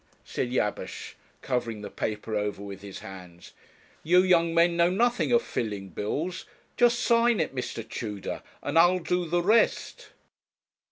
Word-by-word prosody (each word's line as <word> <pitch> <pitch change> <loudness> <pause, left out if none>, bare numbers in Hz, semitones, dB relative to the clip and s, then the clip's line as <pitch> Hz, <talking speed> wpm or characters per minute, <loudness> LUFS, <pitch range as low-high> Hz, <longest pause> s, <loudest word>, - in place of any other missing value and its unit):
said 125 - -3
Jabesh, 105 -5 -3 0.3
covering 115 -5 -2
the 100 - -7
paper 110 0 -3
over 105 -1 -2
with 100 -1 -8
his 100 -1 -9
hands; 90 -3 -11 0.5
'you 180 +3 +4
young 170 -3 +3
men 170 +1 +3
know 170 0 +4
nothing 240 +7 +1
of 235 -1 +4
filling 100 -4 -4
bills; 155 - -3 0.3
just 240 -1 +4
sign 235 -2 +3
it, 160 - -1
Mr. 120 -3 -5
Tudor, 105 -3 -5 0.2
and 150 +3 +2
I'll 175 +2 +5
do 180 0 -1
the 175 +1 +1
rest.' 220 +5 +1
155 Hz, 150 wpm, -27 LUFS, -, 0.5 s, I'll